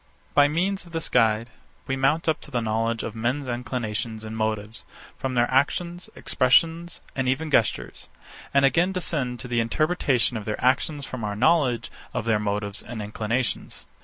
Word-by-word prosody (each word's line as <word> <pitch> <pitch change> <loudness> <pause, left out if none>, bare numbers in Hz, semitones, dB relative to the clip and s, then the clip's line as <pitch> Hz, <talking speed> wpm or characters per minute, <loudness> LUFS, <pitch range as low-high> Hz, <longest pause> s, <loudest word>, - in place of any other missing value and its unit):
By 145 0 +6
means 185 +6 0
of 170 - -15
this 165 0 -2
guide, 115 -1 +2 0.3
we 135 - -1
mount 140 +5 +1
up 160 - +1
to - - -9
the 125 -4 0
knowledge 115 0 0
of 110 - -4
men's 125 +5 -1
inclinations 115 -2 -3
and 110 0 -6
motives, 110 -1 -2 0.3
from 130 -1 -3
their 120 0 +4
actions, 170 +6 0
expressions, 165 +6 +2
and 130 -1 0
even 150 +4 -1
gestures; 115 -6 +1 0.4
and 140 0 +4
again 175 +7 +3
descend 140 -9 -1
to 130 - -6
the 120 -1 0
interpretation 125 -2 +1
of 105 - -6
their 105 - -3
actions 140 +3 +1
from 125 -3 -6
our 105 -1 -2
knowledge 130 -1 +2 0.2
of 125 -3 -1
their 115 -2 +2
motives 105 0 -2
and 115 -1 -7
inclinations. 110 +4 -2
125 Hz, 170 wpm, -25 LUFS, 110-145 Hz, 0.4 s, By